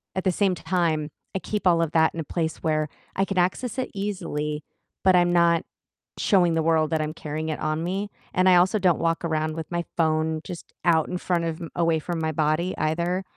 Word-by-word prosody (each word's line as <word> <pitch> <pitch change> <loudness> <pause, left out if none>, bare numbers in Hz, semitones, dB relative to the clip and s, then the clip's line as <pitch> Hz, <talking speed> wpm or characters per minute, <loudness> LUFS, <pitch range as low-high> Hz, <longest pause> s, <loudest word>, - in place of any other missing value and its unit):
at 190 - -1
the 185 - +3
same 190 0 +1
time, 160 -5 0 0.3
I - - +1
keep 210 +1 -4
all 170 -1 +4
of 165 -2 0
that 160 -1 +4
in 165 - -6
a - - -1
place 160 +1 -3
where 155 -1 +1 0.3
I 195 - +2
can 195 -1 -4
access 220 +7 0
it 255 - -2
easily, 150 -7 -3 0.4
but 185 -1 +5
I'm 175 0 +4
not 170 -1 +4 0.6
showing 180 -5 +3
the 165 - +2
world 160 -1 +2
that 160 -1 +1
I'm 155 0 -3
carrying 155 +1 -4
it 155 - -3
on 155 +1 -1
me, 195 +3 -2 0.3
and 185 +1 +4
I 180 - +7
also 185 +4 +4
don't 180 -4 +3
walk 165 +1 0
around 155 -1 -1
with 160 0 -6
my 170 0 -1
phone 160 -1 +1
just 175 -3 -9
out 160 -2 +3
in 180 - -2
front 175 -2 0
of 165 +1 -3
m 165 - -6
away 165 -1 +2
from 170 +1 -4
my 160 0 0
body 155 +4 0
either, 170 +4 0
165 Hz, 225 wpm, -25 LUFS, 155-180 Hz, 0.6 s, I